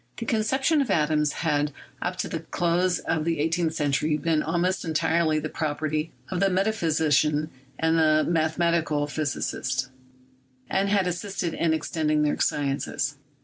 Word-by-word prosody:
The - - -4
conception 265 +7 +2
of 265 - -2
atoms 150 -3 +2
had 150 -1 +1 0.3
up 180 +1 -2
to - - -3
the 165 - -3
close 175 +2 0
of 155 - -1
the 165 0 0
eighteenth 165 +1 0
century 150 0 +1
been 160 0 +1
almost 175 +4 0
entirely 160 0 +1
the 155 0 -2
property 155 0 -2 0.2
of 180 - -1
the 195 +1 +3
metaphysician 160 -6 +1 0.3
and 160 0 +2
the 155 -1 +4
mathematical 165 -2 +1
physicist, 135 -3 -2 0.8
and 195 +1 +1
had 200 -2 +2
assisted 180 0 -3
in 170 - +1
extending 155 -1 0
their 150 - 0
sciences. 140 0 -1
160 Hz, 145 wpm, -26 LUFS, 150-175 Hz, 0.8 s, the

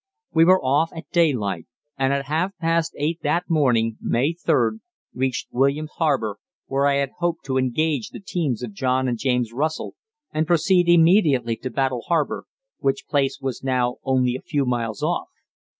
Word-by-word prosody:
We 165 - +5
were 185 +2 +6
off 145 +4 +1
at 165 - -9
daylight, 115 - +1 0.3
and 135 0 +1
at 140 0 -1
half 165 +7 -1
past 165 0 0
eight 160 +4 -1
that 170 +4 0
morning 120 -8 +2
(May 135 +8 +1
3d) 115 -9 +1 0.3
reached 130 0 -2
Williams 140 +4 +1
Harbour, 135 - 0 0.3
where 140 +1 +1
I 140 - +3
had 140 -1 0
hoped 175 -1 -1
to 130 -1 0
engage 130 0 0
the - - -9
teams 155 - -2
of 115 -4 -6
John 130 +2 0
and 120 -2 -2
James 125 -3 0
Russell 155 +5 -2 0.4
and 155 +1 0
proceed 175 +1 +3
immediately 160 - +4
to 130 - -5
Battle 130 -1 -1
Harbour, 165 -4 0 0.3
which 135 - -1
place 140 -2 0
was 135 -2 -4
now 125 -2 0
only 130 -2 +1
a 130 - -6
few 145 -4 -1
miles 115 -4 -2
off. - - -1
135 Hz, 170 wpm, -23 LUFS, 125-160 Hz, 0.4 s, were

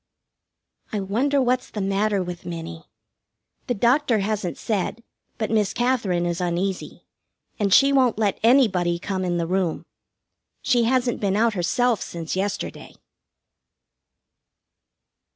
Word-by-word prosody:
I 210 - -1
wonder 240 +9 +1
what's 255 0 +1
the 210 - -6
matter 195 0 0
with 175 -1 -7
Minnie? 165 -1 -7 0.8
The 245 - 0
doctor 240 +3 +3
hasn't 200 -5 -2
said, 215 +2 -2 0.3
but 220 -1 -2
Miss 210 -3 +1
Katherine 225 -9 +1
is 175 0 -2
uneasy, 180 +2 -3 0.5
and 200 -2 +1
she 275 +7 +6
won't 255 -5 +3
let 210 -3 0
anybody 205 -9 +3
come 190 +1 -3
in 175 -1 -1
the 170 - -1
room. 180 -1 -1 0.8
She 240 -2 +3
hasn't 250 0 +1
been 200 -2 +1
out 230 +1 +3
herself 220 +5 +1
since 165 -1 -5
yesterday. 195 +1 -4
205 Hz, 125 wpm, -23 LUFS, 180-240 Hz, 0.8 s, she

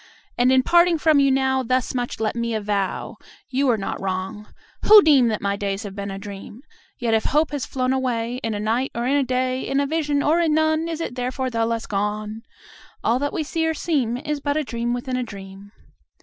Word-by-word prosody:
And, 245 +1 +3
in 260 0 +4
parting 345 +1 +4
from 310 -1 +4
you 275 0 +4
now, 265 0 +2
Thus 255 0 0
much 245 -1 -3
let 220 0 -1
me 235 -1 -2
avow 205 -3 -2 0.3
You 270 +1 +1
are 235 - +3
not 195 - -4
wrong, 190 +2 -4 0.4
who 425 -1 +9
deem 280 -6 +5
That 215 -3 -2
my 200 0 0
days 200 0 -3
have 200 -2 -7
been 200 0 -5
a 195 - -5
dream: 205 +4 -9 0.3
Yet 235 -3 -1
if 220 - +2
hope 300 +2 +2
has 290 -3 -3
flown 255 -1 -1
away 245 -2 -1
In 225 -4 -3
a - - -3
night, 230 +5 0
or 235 +1 -2
in 270 +3 +2
a 285 - +3
day, 255 0 -1
In 275 +1 -1
a 280 - +1
vision 295 -1 0
or 320 +3 +3
in 320 -3 +2
none, 315 +1 +2
Is 330 -1 -4
it 330 - -4
therefore 255 +1 -3
the 230 -1 0
less 230 -1 -2
gone? 210 +2 -3 0.6
All 240 +2 +2
that 285 +1 -1
we 315 - -2
see 325 +2 -2
or 320 - 0
seem 275 -8 0
Is 295 +2 -3
but 285 +1 -1
a 310 - 0
dream 235 -2 -3
within 255 +1 -3
a - - -1
dream. 200 -3 -9
250 Hz, 230 wpm, -22 LUFS, 215-285 Hz, 0.6 s, who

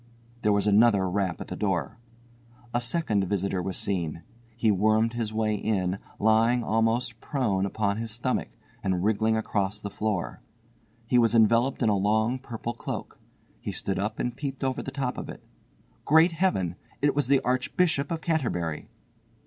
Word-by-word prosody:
There 105 - +3
was 100 -1 +2
another 105 -2 +4
rap 90 -2 -1
at - - -6
the - - -4
door. 95 -3 -2 0.7
A 120 - +1
second 120 - +1
visitor 95 -1 -1
was 95 +1 -3
seen. 85 -5 -2 0.3
He 115 -2 +3
wormed 110 +3 +2
his 115 -2 -2
way 110 0 0
in, 100 -3 -1 0.2
lying 115 +3 +3
almost 115 +2 0
prone 105 -9 0
upon 100 0 -1
his 115 0 -4
stomach, 120 +3 -1 0.3
and 95 -2 0
wriggling 110 +1 +2
across 105 -2 -1
the 100 -1 -6
floor. 105 -4 -2 0.6
He 125 +1 +3
was 115 -1 +3
enveloped 115 +4 +3
in 115 - +3
a 105 - +3
long 110 +5 +1
purple 120 -2 -5
cloak. - - -6 0.4
He - - -4
stood 95 - -2
up 105 +2 -2
and 120 - -2
peeped 135 -2 -5
over 130 -1 -1
the - - -5
top 135 -2 -3
of - - -7
it. - - -9 0.6
Great 160 +4 +5
Heaven! 120 - 0 0.3
It 145 -1 +4
was 145 -3 +1
the 140 0 +4
Archbishop 140 +5 +1
of 165 -2 -3
Canterbury! 90 - -1
110 Hz, 165 wpm, -27 LUFS, 100-125 Hz, 0.7 s, Great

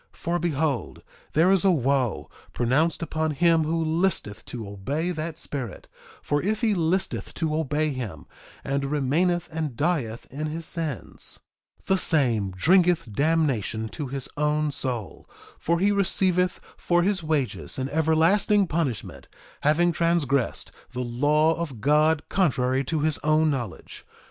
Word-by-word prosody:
2:33 - - -22
For 175 +1 -1
behold, 155 - -1 0.3
there 170 +5 +4
is 195 -3 +4
a 195 - +5
wo 135 - +1 0.3
pronounced 150 +8 +1
upon 160 -1 -1
him 165 0 +3
who 165 +1 0
listeth 160 - 0
to 115 -4 -7
obey 140 - -3
that 160 -1 -4
spirit; 130 - -6 0.4
for 145 0 0
if 215 +3 -1
he 225 -3 +2
listeth 185 +2 -1
to 160 -2 -1
obey 155 0 0
him, 105 - -6 0.4
and 140 0 -1
remaineth 155 +5 +1
and 155 -6 -4
dieth 145 -9 -1
in 150 +4 -3
his 160 +2 -5
sins, 160 -7 -3 0.5
the 190 0 +2
same 120 - +2
drinketh 165 - +2
damnation 140 -7 +1
to 145 +3 -5
his 135 0 -3
own 150 0 +1
soul; 125 -7 -4 0.3
for 170 +1 +1
he 200 +3 +3
receiveth 185 -2 +2 0.2
for 175 0 +2
his 195 0 +1
wages 155 -5 -2
an 130 0 -2
everlasting 165 +7 +3
punishment, 155 - -3 0.3
having 170 +4 +3
transgressed 165 -6 0 0.2
the 125 - -3
law 145 +6 +2
of 150 -9 -5
God 150 +4 +3
contrary 135 -7 +1
to 155 +2 -1
his 155 0 +1
own 155 0 +3
knowledge. 120 -8 -6
155 Hz, 145 wpm, -25 LUFS, 135-170 Hz, 0.5 s, a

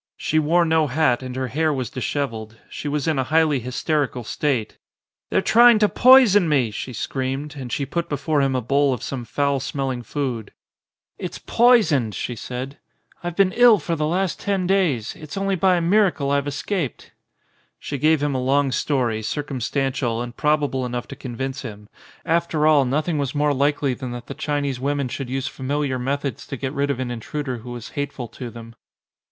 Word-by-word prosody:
She 155 - +1
wore 170 +3 +3
no 160 -1 +2
hat 135 -3 +2
and 130 -1 -6
her 130 -1 -2
hair 155 +5 +1
was 130 -5 -3
dishevelled. 115 -4 -3
She - - -6
was 145 0 -1
in 155 -4 +1
a - - +2
highly 155 0 +3
hysterical 130 +1 -1
state. 125 -1 -2 0.5
"They're - - +1
trying 240 0 +7
to 210 -1 +4
poison 225 -8 +6
me," 130 -7 +2
she 115 +5 -5
screamed 135 +4 -3
and 130 -4 -7
she 140 - -1
put 170 +4 -3
before 145 +1 0
him 135 -1 +1
a 125 - -1
bowl 140 +2 +2
of 115 - -10
some 125 -3 -4
foul 140 +3 0
smell 135 0 -2
ing 125 -1 -4
food. 120 -3 -4 0.7
"It's - - -5
poisoned," 170 - +3
she 120 - -3
said. 130 +5 -6 0.4
"I've 175 -1 -4
been 195 -1 +3
ill 240 0 +6
for 165 0 -2
the 150 -1 -1
last 185 +2 -1
ten 195 -2 -1
days, 175 - +1
it's 155 0 -9
only 195 0 0
by 185 0 +3
a 175 - 0
miracle 175 -6 +2
I've 140 0 +1
escaped." 145 +1 -3 0.7
She 140 - -5
gave 155 +1 +3
him 145 -1 0
a 130 - -1
long 135 +1 +2
story, 125 -4 0
circumstantial 135 -2 -2
and 120 0 -5
probable 150 -3 +1
enough 120 -1 -4
to - - -7
convince 130 +2 -5
him: 105 -4 -9 0.4
after 165 -2 +1
all 150 -3 +5
nothing 150 +4 0
was 140 0 -2
more 145 0 +2
likely 140 0 +1
than 130 0 -6
that 120 0 -7
the - - -7
Chinese 145 -3 -2
women 140 0 -1
should 135 0 -5
use 135 0 -2
familiar 140 0 -2
methods 140 +2 -3
to 135 - -5
get 135 +2 -4
rid 140 -1 0
of 140 -3 -1
an 125 -2 -3
intruder 125 +2 -4
who 120 +2 -10
was 120 -1 -7
hateful 140 -4 -4
to 125 -2 -7
them. 115 0 -11
140 Hz, 190 wpm, -22 LUFS, 125-155 Hz, 0.7 s, trying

